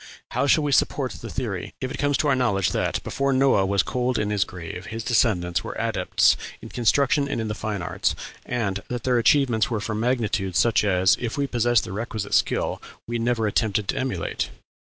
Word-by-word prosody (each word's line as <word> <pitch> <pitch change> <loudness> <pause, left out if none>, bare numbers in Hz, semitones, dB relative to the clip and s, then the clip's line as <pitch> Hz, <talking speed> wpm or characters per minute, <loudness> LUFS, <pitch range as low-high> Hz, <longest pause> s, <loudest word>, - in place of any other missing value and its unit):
How 140 - 0
shall 155 +2 +4
we 145 - 0
support 135 -1 +1
the - - -8
theory 105 -9 -4
if 130 -1 -4
it 135 - -6
come 145 0 +1
to 135 +3 +1
our 140 - +4
knowledge 100 -8 +1
that, - - -1
before 140 0 -1
Noah 130 -7 +3
was 100 0 +2
cold 125 0 -1
in 105 0 -1
his 100 -2 +2
grave, 90 -1 -8
his 115 0 -5
descendants 90 -7 +1
were - - -6
adepts - - +2 0.2
in - - -10
construction 140 +4 +2
and 140 - -2
in 110 -1 -2
the - - -1
fine 105 -4 -4
arts, - - -1 0.3
and 100 -5 -2
that 125 -2 -4
their 125 -2 +2
achievements 120 -3 +3
were 115 -3 -1
for 105 +1 -3
magnitude 110 -5 -1
such 115 +2 +3
as, 95 -2 +3
if 120 +1 -3
we 140 - +1
possess 120 -3 +2
the - - -7
requisite 110 -1 -4
skill, - - +1 0.3
we 120 0 -2
never 115 -1 0
attempt 105 -1 0
to - - -1
emulate?... 125 -11 -2
115 Hz, 205 wpm, -24 LUFS, 100-130 Hz, 0.3 s, shall